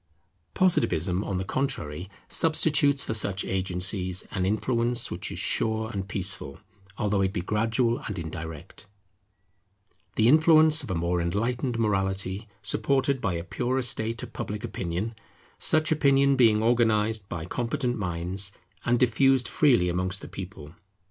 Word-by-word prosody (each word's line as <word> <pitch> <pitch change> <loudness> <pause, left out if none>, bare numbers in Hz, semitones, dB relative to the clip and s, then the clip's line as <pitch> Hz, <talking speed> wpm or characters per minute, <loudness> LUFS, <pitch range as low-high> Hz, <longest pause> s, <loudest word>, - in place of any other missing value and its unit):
Positivism, 100 - +1
on 95 - -3
the 95 - -3
contrary, 95 - -3 0.2
substitutes 150 -3 +2
for - - -3
such 100 -2 0
agencies, 95 0 -1
an 95 -2 -1
influence 115 +3 0
which - - -4
is - - -6
sure 110 0 +1
and 100 -3 -4
peaceful, 95 -8 -4 0.4
although 105 -3 0
it 95 -1 +1
be 95 - -3
gradual 115 +5 0
and - - -4
indirect; 80 -2 -8 1.3
the 110 - +3
influence 155 +2 +6
of 135 - -8
a 95 - -1
more 85 +1 0
enlightened 115 +7 -1
morality, 95 -1 -1 0.2
supported 130 +5 0
by 95 - 0
a 85 - -4
purer 125 +7 -2
state 115 -1 0
of - - -9
Public 105 0 -5
Opinion; 95 +6 -3 0.5
such 155 0 +1
opinion 140 -2 +4
being 110 -4 +4
organized 110 -3 +1
by 80 -3 -5
competent 120 - -2
minds, 95 +1 -2 0.3
and 120 0 +2
diffused 130 +1 +3
freely 125 - +3
amongst 95 +2 -2
the - - -8
people. 90 -5 -9
105 Hz, 140 wpm, -26 LUFS, 95-125 Hz, 1.3 s, influence